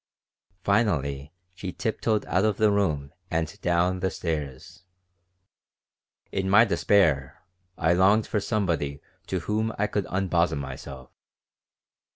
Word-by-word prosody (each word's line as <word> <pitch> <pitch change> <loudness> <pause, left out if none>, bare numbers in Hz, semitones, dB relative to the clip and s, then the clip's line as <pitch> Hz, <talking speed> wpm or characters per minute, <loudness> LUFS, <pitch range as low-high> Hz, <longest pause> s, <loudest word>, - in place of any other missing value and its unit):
Finally 75 - 0 0.2
she 90 +1 -6
tiptoed 110 +1 -1
out 90 - +1
of 105 -2 +1
the 110 -1 +4
room 75 -9 0 0.2
and 80 +4 -2
down 90 +1 +1
the 95 +1 0
stairs. 80 +2 -5 1.5
In 95 -1 -1
my 110 +4 +7
despair 80 - +2 0.3
I 80 +2 +3
longed 100 +5 +4
for 105 - -1
somebody 85 -10 -1 0.3
to - - -2
whom 110 +1 -1
I 100 - +1
could 105 -2 -2
unbosom 90 -5 +1
myself. 65 -1 -8
90 Hz, 120 wpm, -26 LUFS, 75-100 Hz, 1.5 s, my